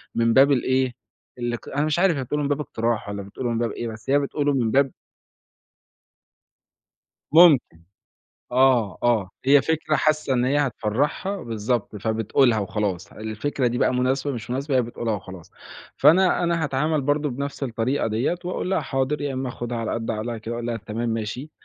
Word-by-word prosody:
من 115 0 +2
باب 140 +2 +6
الإيه، 130 -1 +1 0.4
اللي 120 0 -2
ك - - -13
أنا 145 +2 0
مش 155 +2 0
عارف 180 -5 +3
هي 130 - -2
بتقوله 150 +4 -2
من 140 - -1
باب 145 +1 0
اقتراح 115 -6 -2
والَّا 100 0 -4
بتقوله 120 +5 -5
من 115 - -1
باب 115 -2 -1
إيه، 120 - -5
بس 110 +3 -9
هي 145 +1 +4
بتقوله 145 0 0
من 120 -4 +1
باب 135 -1 +3 2.4
ممكن، 150 - +6 0.7
آه، 125 -6 +3
آه 110 -6 +2
هي 140 +1 +6
فكرة 160 -1 0
حاسة 155 -3 +1
إن 125 0 +2
هي 140 +3 +2
هتفّرحها، 145 - -1
بالضبط، 115 -1 -2
فبتقولها 110 +3 +2
وخلاص، 100 -3 -3
الفكرة 110 +5 -2
دي 120 +1 0
بقى 125 - +2
مناسبة، 130 +3 0
مش 115 -1 -7
مناسبة، 135 +1 -1
هي 125 - +4
بتقولها 115 -1 -3
وخلاص، 95 -3 -9 0.5
فأنا 180 +2 +4
أنا 170 -2 0
هاتعامل 150 +2 0
برضه 145 +2 0
بنفس 140 +3 -5
الطريقة 125 +2 -1
ديَّة 115 +9 0
وأقول 180 +1 -3
لها 190 - +2
حاضر، 135 +2 -1
يا 145 -1 -2
إما 130 0 -3
آخُدها 120 -1 -5
على 115 - -2
قد 115 -1 -3
عقلها 115 +1 -3
كده، 110 +2 -6
وأقول 120 0 -4
لها 120 -1 -2
تمام 115 +3 -4
ماشي، 115 +6 -4
125 Hz, 180 wpm, -23 LUFS, 115-145 Hz, 2.4 s, باب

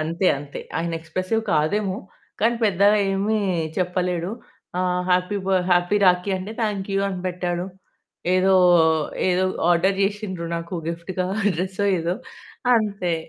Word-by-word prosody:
అంతే 165 +4 -1
అంతే. 145 0 -8 0.2
ఆయన 170 0 -2
ఎక్స్ప్రెసివ్ 185 +7 -2
కాదేమో, 185 +6 +1 0.4
కానీ 230 +2 +3
పెద్దగా 200 +1 +4 0.2
ఏమి 205 +3 0 0.4
చెప్పలేడు. 180 -1 -1 0.5
ఆహ్, 180 0 0
హ్యాపీ 180 +2 +2
బర్త్ 185 -2 +2
హ్యాపీ 175 +3 +3
రాఖి 180 +2 +3
అంటే 190 +4 -6
థాంక్ 205 -3 -2
యూ 195 - +2
అని 185 -2 -4
పెట్టాడు. 175 0 -3 0.7
ఏదో, 190 +1 +4 0.8
ఏదో 180 +1 +2 0.3
ఆర్డర్ 190 +3 +3
చేసిండ్రు 195 -4 -2
నాకు 170 +2 -6 0.2
గిఫ్ట్‌గా 180 +2 -4 0.3
డ్రెస్సో, 190 +3 -1
ఏదో 170 +3 -1 0.6
అంతే. 200 -5 0
185 Hz, 125 wpm, -23 LUFS, 175-195 Hz, 0.8 s, పెద్దగా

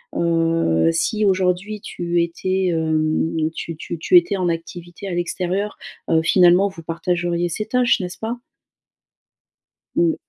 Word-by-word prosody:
Heu, 165 - +2
si 210 +6 0
aujourd'hui, 190 +2 0
tu 175 0 -1
étais, 185 +2 -1
hem, 160 0 0
tu 165 0 -6
tu 165 +2 -6
tu 360 - +5
étais 205 - +2
en 180 -1 0
activité 175 +3 -6
à 180 - -3
l'extérieur, 180 +3 -2 0.3
heu, 160 -1 +4
finalement, 180 +2 +5
vous 170 -3 -11
partageriez 175 +1 -1
ces 210 +6 -3
tâches, 245 -1 +2
n'est-ce 180 -1 -5
pas? 230 +2 -4 1.6
Mmh. 170 -1 +3
175 Hz, 135 wpm, -21 LUFS, 165-190 Hz, 1.6 s, tu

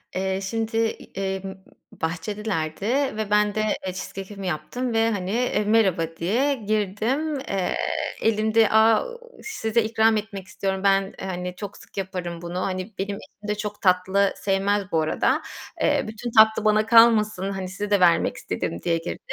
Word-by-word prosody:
Eee, 190 0 -1
şimdi, 225 +3 -2 0.4
emm, 190 0 -3 0.3
bahçedelerdi 165 0 -3 0.3
ve 215 -1 -2
ben 210 0 +3
de, - - 0
eee, 215 -1 +1 0.2
cheesecakeimi 195 +1 -6
yaptım 240 +9 -3
ve, 225 0 +3
hani, 190 -3 -3
eee, 230 -2 0
"Merhaba." 190 -7 +2
diye 240 +12 +1
girdim. 220 +8 -1
Eee, 195 -8 -2 0.5
elimde, 220 0 +3
"Aaa, 220 - +5 0.4
size 235 - 0
ikram 220 0 +3
etmek 200 -3 -6
istiyorum, 190 0 -3
ben, 195 -1 +2
hani, 180 -1 -4
çok 205 0 -7
sık - - -17
yaparım 180 -3 -4
bunu. 175 +1 -5
-Hani, 185 +3 -3
benim 200 +1 -2
eşim 205 +1 -13
de 210 - 0
çok 210 0 -5
tatlı 190 +1 +3
sevmez 195 0 0
bu 160 - +2
arada. 155 - +1 0.4
Eee, - - +2
bütün 220 +2 -6
tatlı 220 -1 +5
bana 215 0 +4
kalmasın, 220 -4 +5
hani, 190 -1 -4
size 205 +2 -5
de 205 - +4
vermek 175 -2 +4
istedim." 85 - -4
diye 165 -1 +1
girdim. 165 +1 -5
200 Hz, 155 wpm, -24 LUFS, 190-220 Hz, 0.5 s, Aaa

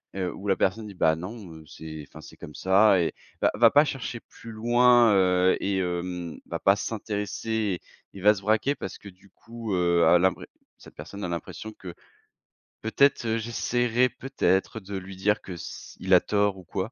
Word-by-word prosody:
heu, 90 -2 -2
où 100 - -8
la 95 - +3
personne 105 +3 0
dit: 100 - -9
«Bah 80 -2 +3
non, 95 0 -8
heu, 80 - -12
c'est 80 -1 -9
enfin - - -13
c'est - - -14
comme 75 - -10
ça» 95 +1 +4
et 85 - +1
heu, - - -4 0.3
va - - +3
va 115 0 +6
pas 145 +2 +5
chercher 125 -4 -5
plus 115 - -13
loin, 120 0 +4
heu 90 -1 +3
et 95 -1 -1
hem, 90 -2 -4
va - - -5
pas 95 - +4
s'intéresser 105 -1 -3 0.3
il 95 - -10
va 105 +1 +7
se 100 - -8
braquer 110 +7 +1
parce - - -7
que 100 - -11
du 95 +2 -21
coup, 115 -1 -7
heu, 85 -1 +3
à 90 - +6
l'impré 95 0 +1 0.3
cette - - -16
personne 100 0 -9
a - - -2
l'impression 85 +5 -6
que, 90 -4 -10 0.9
peut-être, 135 +3 +2
heu, 110 +1 +1
j'essaierai 120 +2 0
peut-être, 120 -5 -1
heu, - - -6
de 100 +1 -8
lui 95 0 -8
dire 105 +3 +1
que 95 - -10
s 85 - -9
il 95 0 0
a - - +7
tort 100 -2 0
ou 95 - -11
quoi. 95 +6 -4
100 Hz, 205 wpm, -26 LUFS, 90-115 Hz, 0.9 s, va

